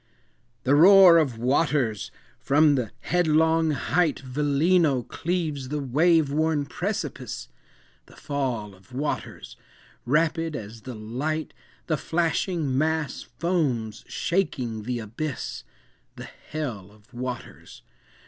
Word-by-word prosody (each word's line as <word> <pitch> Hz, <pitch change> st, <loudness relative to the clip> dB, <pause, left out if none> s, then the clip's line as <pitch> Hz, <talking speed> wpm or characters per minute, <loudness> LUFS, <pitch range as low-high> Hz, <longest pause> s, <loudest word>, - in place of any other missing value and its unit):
"The 130 Hz, -, +2 dB
roar 180 Hz, +2 st, +8 dB
of 135 Hz, -8 st, 0 dB
waters!—from 135 Hz, -, +1 dB
the 125 Hz, -6 st, -1 dB
headlong 160 Hz, -1 st, +2 dB
height 155 Hz, +2 st, +1 dB
Velino 145 Hz, +1 st, +2 dB
cleaves 160 Hz, -6 st, -3 dB
the 150 Hz, -, -2 dB
wave 150 Hz, +3 st, +3 dB
worn 155 Hz, -1 st, +1 dB
precipice; -, -, -4 dB, 0.6 s
The -, -, -17 dB
fall 130 Hz, -8 st, -3 dB
of 95 Hz, +5 st, -20 dB
waters! 145 Hz, +4 st, -4 dB, 0.5 s
rapid 165 Hz, +3 st, +1 dB
as 110 Hz, -2 st, -8 dB
the 125 Hz, 0 st, -7 dB
light 130 Hz, +9 st, -3 dB, 0.3 s
The 155 Hz, -, 0 dB
flashing 165 Hz, -2 st, -1 dB
mass 155 Hz, 0 st, 0 dB, 0.2 s
foams 130 Hz, -, -1 dB
shaking 125 Hz, -, -2 dB
the 125 Hz, 0 st, -2 dB
abyss; 120 Hz, +7 st, -5 dB, 0.5 s
The -, -, -9 dB, 0.2 s
hell 120 Hz, -12 st, -4 dB
of 105 Hz, +4 st, -23 dB
waters! 125 Hz, 0 st, -7 dB
145 Hz, 105 wpm, -25 LUFS, 125-160 Hz, 0.6 s, roar